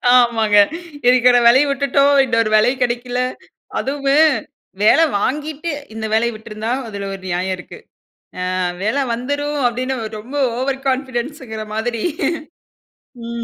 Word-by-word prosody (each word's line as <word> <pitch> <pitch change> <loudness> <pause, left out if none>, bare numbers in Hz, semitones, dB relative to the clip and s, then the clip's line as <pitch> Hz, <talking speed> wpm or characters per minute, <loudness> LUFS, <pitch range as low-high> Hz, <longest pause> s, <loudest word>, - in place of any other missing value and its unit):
ஆமாங்க 225 -4 +3 0.5
இருக்குற 250 0 +5
வேலையும் 275 +4 +5
விட்டுட்டோம் 280 0 +2
இன்னொரு 230 -3 +1
வேலையும் 245 +5 +2
கெடைக்கல. 245 +1 -1 0.6
அதுவும் 280 +2 +2 0.6
வேலை 320 +10 +6 0.2
வாங்கிட்டு 300 +5 -2 0.2
இந்த 220 0 -5
வேலைய 235 +2 +2
விட்டுருந்தா 220 +1 -5 0.2
அதில 200 -2 -6
ஒரு 195 - -8
நியாயம் 185 +2 -1
இருக்கு. 180 - -11 0.8
ஆ - - -1 0.3
வேலை 245 +7 +1
வந்துரும் 285 +4 -2
அப்டின்னு 255 +2 -2 0.2
ரொம்ப 250 +7 -9 0.2
ஓவர் 270 +1 -2
கான்ஃபிடன்ஸ்ன்கிற 260 -3 -3
மாதிரி. 230 0 -2 1.2
ம். 235 0 -4
245 Hz, 115 wpm, -19 LUFS, 220-275 Hz, 1.2 s, வேலை